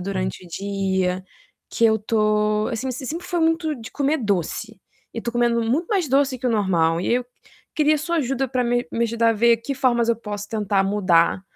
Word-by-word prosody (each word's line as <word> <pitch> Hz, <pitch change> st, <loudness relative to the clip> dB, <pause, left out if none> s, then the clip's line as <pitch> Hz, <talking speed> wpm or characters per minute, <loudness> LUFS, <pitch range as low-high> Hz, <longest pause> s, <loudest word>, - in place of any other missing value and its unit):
durante 185 Hz, -1 st, -3 dB
o -, -, -13 dB
dia, 190 Hz, -1 st, -2 dB, 0.5 s
que 230 Hz, -, +1 dB
eu 220 Hz, 0 st, +3 dB
tô, 215 Hz, 0 st, +1 dB
assim 235 Hz, +3 st, -3 dB
me 255 Hz, -, -2 dB
eu 260 Hz, -, -7 dB
sempre 335 Hz, +6 st, -5 dB
fui 350 Hz, -1 st, -1 dB
muito 325 Hz, -1 st, +1 dB
de 225 Hz, -2 st, -10 dB
comer 290 Hz, +2 st, 0 dB
doce 200 Hz, -, -2 dB, 0.4 s
e 230 Hz, -, -3 dB
tô 235 Hz, -, -3 dB
comendo 235 Hz, -1 st, +2 dB
muito 270 Hz, +10 st, 0 dB
mais 390 Hz, -6 st, +1 dB
doce 270 Hz, -1 st, +2 dB
que 250 Hz, -, -3 dB
o -, -, +2 dB
normal 170 Hz, -6 st, +1 dB
e 185 Hz, -, +1 dB
eu 250 Hz, 0 st, 0 dB, 0.5 s
queria 305 Hz, -1 st, +3 dB
sua 340 Hz, +3 st, -2 dB
ajuda 270 Hz, -3 st, 0 dB
pra 255 Hz, 0 st, 0 dB
me 245 Hz, 0 st, 0 dB
me 235 Hz, -, +1 dB
ajudar 230 Hz, 0 st, +2 dB
a -, -, +3 dB
ver 235 Hz, +2 st, +4 dB
que 275 Hz, +4 st, -4 dB
formas 240 Hz, -3 st, +1 dB
eu 230 Hz, -, +1 dB
posso 205 Hz, -2 st, -6 dB
tentar 205 Hz, -3 st, 0 dB
mudar 185 Hz, -3 st, +2 dB
230 Hz, 215 wpm, -22 LUFS, 200-265 Hz, 0.5 s, ver